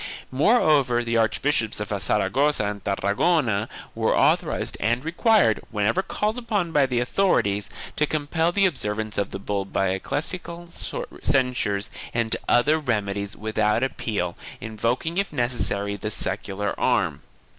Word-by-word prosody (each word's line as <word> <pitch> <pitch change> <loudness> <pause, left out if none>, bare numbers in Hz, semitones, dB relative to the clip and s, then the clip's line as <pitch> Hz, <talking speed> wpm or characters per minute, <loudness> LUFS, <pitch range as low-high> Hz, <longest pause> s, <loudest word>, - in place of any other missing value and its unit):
Moreover 140 - +3
the 115 0 0
Archbishops 115 0 +1
of 105 - -4
Saragossa 105 - +2
and 100 -1 -4
Tarragona 105 - +1 0.2
were - - +1
authorized - - +2
and 120 +6 0
required, 180 - +3
when 105 -2 -1
ever 145 - +2
called 215 +4 -2
upon 205 -8 -1
by 145 -3 +3
the 125 -2 0
authorities, 120 - +1 0.3
to 150 - +2
compel 155 +3 0
the 195 +2 +3
observance 110 - -1
of 100 - -1
the - - -5
bull 100 0 -2
by 95 0 0
ecclesiastical 170 - -3 0.5
censures 125 -7 +1 0.2
and 115 -1 +1
other 150 +6 +4
remedies 100 -6 -2
without 110 +1 +1
appeal, 105 -9 -2 0.2
invoking 115 - -1
if 200 - -1
necessary 110 -5 -1
the 105 - -3
secular 105 -1 -3
arm. - - +1
120 Hz, 135 wpm, -24 LUFS, 105-155 Hz, 0.5 s, other